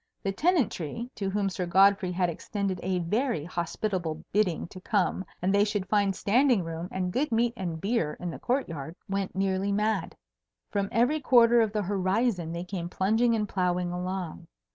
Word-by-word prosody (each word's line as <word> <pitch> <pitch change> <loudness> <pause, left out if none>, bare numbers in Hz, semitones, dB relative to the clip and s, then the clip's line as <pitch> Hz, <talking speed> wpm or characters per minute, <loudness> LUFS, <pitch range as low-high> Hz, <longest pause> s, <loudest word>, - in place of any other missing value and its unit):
The 195 - 0
Tenantry 240 - 0
(to 195 -2 -3
whom 200 0 0
Sir 180 -1 -3
Godfrey 195 +1 +4
had 180 0 +1
extended 190 +2 -3
a 185 0 0
very 195 - 0
hospitable 170 -1 -3
bidding 200 -5 +1
to 185 - -11
come 190 -2 0 0.2
and 190 +2 +2
they 200 0 +5
should 205 -2 -1
find 200 -2 +2
standing 240 0 +3
room 165 +1 -5
and 180 -1 -2
good 275 +1 0
meat 230 +1 +2
and 175 -6 -4
beer 195 -5 -1
in 175 -1 -4
the - - -8
court 260 +3 0
yard) 160 0 -6
went 195 -1 -2
nearly 195 +1 0
mad. 210 -2 0 0.6
From 200 -1 -1
every 250 +7 +2
quarter 240 -3 +5
of 220 -2 +1
the 210 -1 -1
horizon 190 -1 0
they 170 +1 -4
came 180 -2 -5
plunging 220 +6 +2
and 210 -1 -1
ploughing 180 -2 0
along. 180 -2 -4
195 Hz, 180 wpm, -28 LUFS, 180-220 Hz, 0.6 s, they